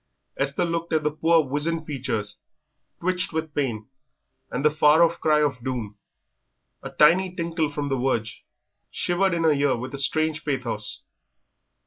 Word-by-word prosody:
Esther 140 +5 0
looked 170 0 -3
at 155 -1 +2
the 150 - +1
poor 165 +2 +3
wizened 150 +4 -2
features, 115 -8 -3 0.6
twitched 185 +1 0
with 160 -1 -3
pain, 115 -7 -2 0.6
and 135 +4 -3
the 150 - +5
far 155 +2 +5
off 170 0 +1
cry 150 -1 +3
of 135 -5 -2
doom, 120 -5 -4 0.9
a - - -7
tiny 180 +4 +3
tinkle 165 -3 -1
from 145 0 -3
the 135 - +1
verge, 120 -4 -2 0.5
shivered 175 +1 +1
in 165 - -1
the 160 - +5
ear 145 -1 +2
with 130 +3 -7
a 140 - -1
strange 155 +3 +1
pathos. 125 -7 -3
150 Hz, 155 wpm, -24 LUFS, 130-165 Hz, 0.9 s, the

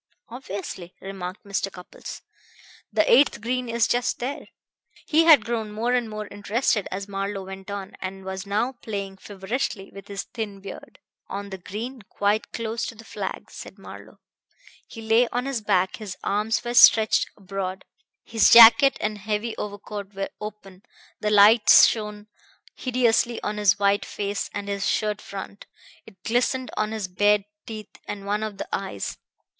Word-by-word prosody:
"Obviously," 195 -7 -7
remarked 190 -1 -7
Mr. 200 0 -2
Cupples. 180 -1 -10 0.7
"The - - +3
eighth 470 - +5
green 250 +2 -2
is 230 0 +2
just 245 0 0
there." 260 +4 -5 0.6
He 320 +2 +4
had 295 -10 +7
grown 225 -2 -2
more 230 +4 -1
and 245 -3 +1
more 215 0 -5
interested 210 +1 0
as 195 +1 -5
Marlowe 195 0 -4
went 190 +1 -9
on, 200 -1 -6
and 190 0 -6
was 190 +1 -5
now 215 +6 0
playing 200 -6 -6
feverishly 195 +1 -4
with 195 0 -11
his 200 -2 -5
thin 215 -4 -6
beard. 195 0 -10 0.3
"On 200 0 -6
the 190 - -6
green, 230 +8 -6
quite 205 +2 -1
close 230 0 -3
to - - -7
the 225 - -13
flag," - - -6
said - - -10
Marlowe. - - -12 0.7
"He 225 - -10
lay 225 +2 +4
on 245 +2 -2
his 270 -4 -2
back, 190 -3 +1
his 205 -4 -7
arms 215 +3 0
were 240 - -3
stretched 220 -2 +6
abroad, 190 -1 -5 0.4
his 225 -1 +3
jacket 235 +4 +9
and 210 0 -2
heavy 215 +2 -2
overcoat 205 -1 -6
were 195 0 -3
open; 205 -3 -9 0.4
the 210 - 0
light 210 +2 +6
shone 210 -2 +5 0.5
hideously 240 -2 +1
on 210 0 -2
his 205 -2 +4
white 200 0 +2
face 200 0 -3
and 205 -1 -5
his 200 -1 -1
shirt 210 -1 0
front; 200 +1 -8 0.4
it 190 -4 -17
glistened 250 +2 0
on 215 0 -1
his 215 -3 -3
bared 205 +2 +2 0.2
teeth 215 -2 -9
and 205 -1 -6
one 205 +1 -1
of 215 -2 -4
the - - -5
eyes. 190 - -4
210 Hz, 160 wpm, -24 LUFS, 195-230 Hz, 0.7 s, jacket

